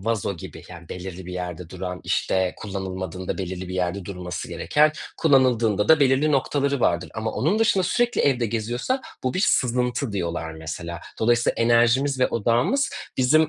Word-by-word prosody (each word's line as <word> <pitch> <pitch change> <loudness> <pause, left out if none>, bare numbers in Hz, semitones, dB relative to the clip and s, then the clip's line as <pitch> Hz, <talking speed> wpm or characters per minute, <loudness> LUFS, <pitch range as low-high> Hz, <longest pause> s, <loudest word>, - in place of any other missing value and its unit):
vazo 105 -3 -1
gibi, - - -9
yani 85 -2 -11
belirli 90 0 -7
bir 90 - -6
yerde 90 -2 -5
duran, 90 -1 -5
işte, 95 -1 +1
kullanılmadığında 95 -2 -5
belirli 95 -1 -4
bir 90 - -5
yerde 90 +1 -1
durması 90 -3 -6
gereken, 150 +1 +2 0.2
kullanıldığında 120 - +3
da 160 -1 +7
belirli 140 +2 +3
noktaları 140 0 +1
vardır 85 0 +1
ama 110 0 -2
onun 175 +10 +1
dışında 215 -4 +3
sürekli 240 +5 +1
evde 125 -4 +2
geziyorsa 120 - -2 0.2
bu 130 - -1
bir 185 - 0
sızıntı 125 0 +1
diyorlar 85 -3 -3
mesela. 85 +2 -6 0.2
Dolayısıyla 120 +1 +2
enerjimiz 120 +4 +3
ve 130 - +5
odağımız 120 - +1 0.3
bizim 155 +5 +4
110 Hz, 155 wpm, -24 LUFS, 90-135 Hz, 0.3 s, da